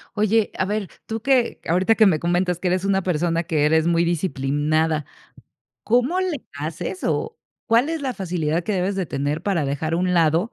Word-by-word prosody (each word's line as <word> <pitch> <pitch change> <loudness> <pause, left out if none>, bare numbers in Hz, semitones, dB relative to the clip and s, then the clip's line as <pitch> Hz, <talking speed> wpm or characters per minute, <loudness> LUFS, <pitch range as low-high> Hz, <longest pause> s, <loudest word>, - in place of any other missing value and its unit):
Oye, 215 0 +2
a - - +2
ver, 205 0 -2 0.2
tú 225 0 -4
que, 250 0 +1
ahorita 185 +6 +3
que 220 -1 +5
me 170 -6 +3
comentas 175 +1 0
que 180 - -1
eres 185 +1 0
una 195 -1 +1
persona 170 -1 0
que 160 -4 0
eres 160 +1 +3
muy 170 0 +3
disciplinada, 155 -1 0 0.8
¿cómo 250 +10 +2
le 355 -8 -3
haces, 155 - -5
o 450 0 -1 0.3
cuál 235 +4 +3
es 325 -1 -2
la 265 -3 -3
facilidad 170 -4 -1
que 210 - -2
debes 190 +1 0
de 190 -2 -1
tener 145 +2 -2
para 190 -7 0
dejar 145 +4 -2
a - - +1
un 180 +1 0
lado 165 +5 +2
180 Hz, 195 wpm, -22 LUFS, 160-215 Hz, 0.8 s, que